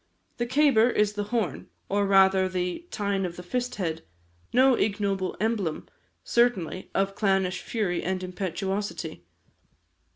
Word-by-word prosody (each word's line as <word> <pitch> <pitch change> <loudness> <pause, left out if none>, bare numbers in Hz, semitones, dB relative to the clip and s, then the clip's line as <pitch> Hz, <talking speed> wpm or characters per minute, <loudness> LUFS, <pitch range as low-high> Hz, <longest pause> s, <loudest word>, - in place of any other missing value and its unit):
The 240 - -1
cabar 260 -3 +4
is 210 -3 +2
the 205 0 -3
horn, 210 - -2 0.2
or, 200 0 +1
rather, 190 -1 +5
the 180 - -3
"tine 200 -2 -1
of 175 -2 -3
the 180 - -8
first 250 +6 -2
head," 165 -6 -2 0.5
no 260 +1 +5
ignoble 200 -4 0
emblem, 210 -7 -1 0.4
certainly, 205 -7 +1
of 195 0 +1
clannish 190 -3 +1
fury 200 -7 -1
and 185 0 -2
impetuosity. 185 - -4
195 Hz, 130 wpm, -27 LUFS, 185-220 Hz, 0.5 s, rather